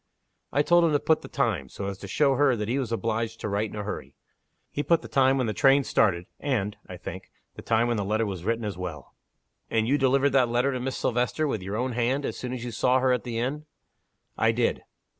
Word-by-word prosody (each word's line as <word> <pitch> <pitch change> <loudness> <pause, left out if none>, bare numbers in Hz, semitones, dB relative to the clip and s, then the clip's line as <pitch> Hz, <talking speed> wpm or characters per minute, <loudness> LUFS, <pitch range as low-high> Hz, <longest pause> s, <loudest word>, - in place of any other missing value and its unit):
I 145 +3 +2
told 175 +2 +5
him 165 -2 +3
to 145 - +3
put 160 +1 +2
the - - -9
time 110 - -1
so 100 - -6
as 100 -1 -5
to 100 - -8
show 140 +7 +3
her 135 -1 +3
that 105 -2 -3
he 125 +5 0
was 125 -4 -3
obliged 115 0 -2
to - - -2
write 105 +1 -1
in - - -9
a 105 - -3
hurry. 70 -9 -6 0.6
He 145 - -2
put 165 +2 +2
the - - -7
time 135 0 +3
when 130 - +1
the 110 - -1
train 135 +5 +4
started; 90 -8 +2
and 110 -8 -1
(I - - -8
think) - - -8 0.2
the - - -10
time 115 +1 +2
when 120 -1 0
the 100 - -1
letter 110 +3 0
was 95 -4 -5
written 115 +2 -1
as 105 - -3
well." 85 -6 -7 0.6
"And 110 0 +1
you 145 +3 +2
delivered 135 +1 +3
that 130 -3 +3
letter 120 +3 +2
to 130 - -3
Miss 130 +1 -3
Silvester, 125 +5 0
with 110 -8 -2
your 100 +3 -4
own 125 +2 -1
hand, 125 +4 0
as - - -3
soon 125 - -5
as 125 -1 -5
you 120 - -4
saw 125 +3 +2
her 130 0 +3
at 125 - 0
the 120 -2 -4
inn?" 140 +6 -2 0.7
"I - - +4
did." - - 0
120 Hz, 255 wpm, -26 LUFS, 110-135 Hz, 0.7 s, told